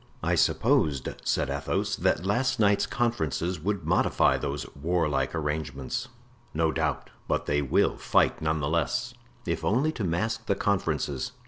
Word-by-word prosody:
"I - - +1
supposed," 70 -4 +2
said - - 0
Athos, - - -1
"that 90 - +1
last 125 +5 +1
night's 100 -2 +3
conferences 90 - -1
would 95 0 -2
modify 80 - +3
those 70 0 -3
warlike 75 -2 0
arrangements." 75 -4 -3 0.5
"No 80 0 +2
doubt; - - -2 0.2
but - - 0
they 75 0 +1
will 70 - +2
fight, - - +2
none 80 0 0
the 70 - 0
less, 85 - 0 0.3
if - - -2
only 130 +9 +2
to 120 - -5
mask 95 +6 -1
the 100 - +2
conferences." 95 -8 -1
85 Hz, 145 wpm, -27 LUFS, 75-100 Hz, 0.5 s, night's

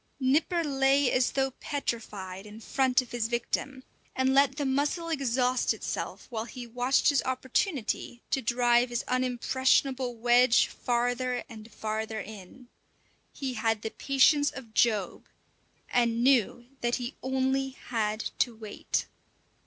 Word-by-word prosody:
Nipper 300 +6 +2
lay 275 -2 +3
as 250 0 +2
though 270 -1 +1
petrified 210 -9 -5
in 210 +1 -11
front 260 +2 +1
of 240 - -16
his 235 -2 -1
victim, 245 +3 -3 0.3
and 260 0 +2
let 275 -1 +4
the 290 - -1
mussel 290 +5 0
exhaust 255 -4 +1
itself - - -5
while 225 -1 -3
he 240 +2 -8
watched 245 +4 +2
his 285 -3 +3
opportunity 260 - -2
to 270 - +1
drive 240 +1 +3
his 240 -1 -2
unimpressionable 255 0 +1
wedge 240 +1 +4
farther 245 +1 -1
and 220 -1 -12
farther 220 +1 -3
in. 215 +4 -10 0.6
He 270 -3 -4
had 225 -2 0
the 220 - -3
patience 285 +2 +3
of 235 -5 -11
Job, 215 -6 +1 0.6
and 235 -1 +1
knew 245 -2 +3 0.2
that 240 0 +1
he 245 0 -4
only 265 +1 0
had 225 -4 -3
to 240 - +1
wait. 215 -2 -3
250 Hz, 135 wpm, -28 LUFS, 230-265 Hz, 0.6 s, let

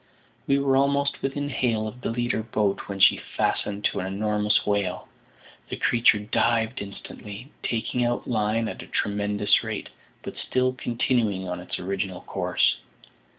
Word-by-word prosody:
We 140 - +4
were 140 -1 +2
almost 140 +1 +2
within 145 +1 -2
hail 115 -5 0
of 125 +4 -8
the - - -2
leading 120 0 0
boat 100 -2 +1
when 100 -1 -5
she - - +6 0.2
fastened 105 0 0
to - - +1
an 95 - -2
enormous 105 +1 +1
whale. 100 -3 0 0.6
The - - -3
creature 115 -2 +4
dived 110 +2 +1
instantly, 100 +4 -9
taking 120 +2 -1
out 120 0 0
line 110 0 +1
at - - -5
a - - -10
tremendous 105 +1 +1
rate, 110 -2 -4 0.3
but - - -7
still 130 0 +1
continuing 115 -6 0
on 90 0 -3
its 90 - -5
original 95 0 -3
course. - - +1
110 Hz, 150 wpm, -26 LUFS, 100-125 Hz, 0.6 s, she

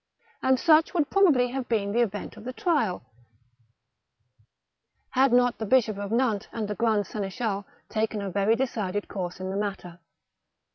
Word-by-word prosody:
And 260 -1 +3
such 325 +2 +4
would 305 -4 +1
probably 310 -11 +4
have 260 0 -4
been 205 -3 0
the 235 +3 +2
event 210 -2 -3
of 215 - -12
the 255 +2 -5
trial, 250 - 0 2.1
had 265 0 +3
not 245 0 +3
the 220 - -2
Bishop 220 -4 +2
of 200 0 -5
Nantes 230 -4 +1
and 220 -2 -3
the 210 - -2
grand 215 -1 +1
seneschal 200 0 -3 0.2
taken 220 -1 -1
a 200 -1 -4
very 200 +4 +2
decided 210 -6 -2
course 180 -3 -5
in 185 0 -4
the - - -4
matter. 195 -4 -4
220 Hz, 160 wpm, -26 LUFS, 200-250 Hz, 2.1 s, such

